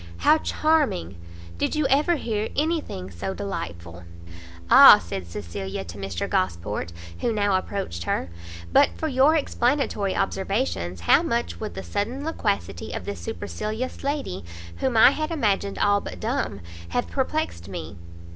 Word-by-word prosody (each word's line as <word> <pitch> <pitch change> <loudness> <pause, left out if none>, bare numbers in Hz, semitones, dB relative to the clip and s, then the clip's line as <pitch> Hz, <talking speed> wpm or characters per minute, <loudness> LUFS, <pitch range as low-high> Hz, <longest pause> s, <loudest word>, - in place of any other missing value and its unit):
how 315 - +6
charming!" 295 - +1 0.4
"Did - - 0
you 305 -1 +1
ever 290 +6 +3
hear 220 -7 -2
any 320 +2 +1
thing 95 - -8
so 95 +2 -4
delightful? 85 -3 -6 0.3
" 85 - -15 0.3
"Ah," - - +11
said 85 +1 -6
Cecilia 95 +2 -5
to 85 +4 -9
Mr 95 -3 -3
Gosport, 85 0 -1 0.3
who 235 - 0
now 205 -3 +1
approached 185 - -3
her, 85 - -1 0.4
"but - - +6
for 320 - -2
your 280 +2 +4
explanatory 245 -8 0
observations, 195 - -1
how 85 - +5
much 85 +1 -2
would 85 - -5
the 95 - -5
sudden 225 - -3
loquacity 200 - -2
of - - -5
this 100 -3 -5
supercilious 210 - -5
lady, 280 - -2 0.3
whom 260 -3 0
I 225 - +8
had 310 +2 -2
imagined 205 -10 0
all 205 0 +3
but - - -8
dumb, 220 - -2 0.3
have - - 0
perplext 85 0 -2
me!" 85 -2 -7
190 Hz, 150 wpm, -24 LUFS, -, 0.4 s, Ah